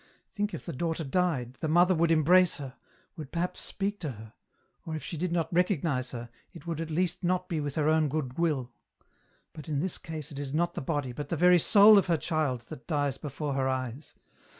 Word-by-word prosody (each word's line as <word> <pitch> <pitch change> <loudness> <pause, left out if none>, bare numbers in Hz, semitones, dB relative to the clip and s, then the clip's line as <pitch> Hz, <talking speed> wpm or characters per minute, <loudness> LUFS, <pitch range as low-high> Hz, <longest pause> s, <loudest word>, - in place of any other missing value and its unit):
Think 205 0 -2
if - - -9
the 170 - -5
daughter 165 +3 -2
died, 135 -5 -1
the 160 - -2
mother 175 +4 +4
would 170 -1 +2
embrace 170 +3 +4
her, 135 -3 -7 0.4
would 155 -6 -8
perhaps 175 +1 -2
speak 205 +1 -3
to 150 -7 -4
her, 110 0 -12 0.5
or 160 - -5
if 155 - -6
she - - -6
did 175 +2 -2
not 170 -1 -1
recognize 165 -7 +1
her, 120 -1 -7 0.2
it 170 - -12
would 165 -2 -3
at 165 - -4
least 175 +3 -1
not 180 +1 0
be 165 - -2
with 145 -1 -4
her 155 -1 +1
own 155 -1 +3
good 135 -2 -3
will; 145 -8 0 0.8
but 155 0 -10
in 145 -2 0
this 185 +3 -2
case 155 -1 -7
it 140 - -7
is 145 0 -4
not 170 +2 +1
the - - -4
body, 145 -2 -2
but 145 +4 -6
the 170 - -1
very 180 +2 +6
soul 205 +4 +7
of 195 - -2
her 170 -2 +2
child 150 -6 -1
that 125 - -10
dies 145 -4 -1
before 145 0 -4
her 135 -1 0
eyes. 130 +2 -4
155 Hz, 220 wpm, -29 LUFS, 140-175 Hz, 0.8 s, soul